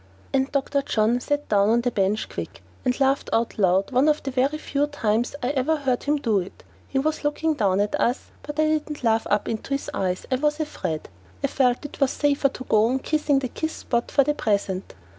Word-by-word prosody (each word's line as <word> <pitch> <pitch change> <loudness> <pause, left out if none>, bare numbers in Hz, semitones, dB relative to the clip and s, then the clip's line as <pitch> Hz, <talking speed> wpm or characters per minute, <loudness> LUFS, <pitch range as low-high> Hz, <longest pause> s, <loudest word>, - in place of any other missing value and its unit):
And 270 0 +1
Dr. 280 0 0
John 230 -2 +1
sat 290 +3 -2
down 200 -1 +3
on 235 +2 +3
the 245 0 0
bench 205 +1 0
quick, - - -7 0.2
and 250 +1 0
laughed 270 0 +2
out 225 -1 0
loud 190 0 +3
one 260 +4 +4
of 300 - +1
the 270 - -3
very 270 +4 +1
few 290 -1 -1
times 235 -4 0
I 250 - +1
ever 290 +3 +1
heard 265 -4 -1
him 295 +1 +2
do 225 -8 +1
it. 185 +1 -8 0.2
He 270 - -3
was 310 +4 0
looking 305 +2 +1
down 200 -8 +1
at 205 0 0
us, 245 +3 0
but 295 +1 -7
I 310 - +5
didn't 305 -2 -1
laugh 225 -1 +2
up 205 0 +1
into 230 +5 -2
his 275 - -5
eyes. 185 -1 -1
I 255 - +3
was 300 +3 0
afraid. 180 - -3 0.4
I - - +3
felt 250 +1 +1
it 290 - -8
was 275 - +4
safer 280 -1 +2
to 260 - -8
go 220 -2 +3
on 255 +3 +1
kissing 300 +1 +1
the 270 -1 0
kiss 315 +6 -3
spot 235 -1 -2
for 280 - +4
the 295 - +1
present. 200 -6 -1
260 Hz, 225 wpm, -24 LUFS, 220-290 Hz, 0.4 s, I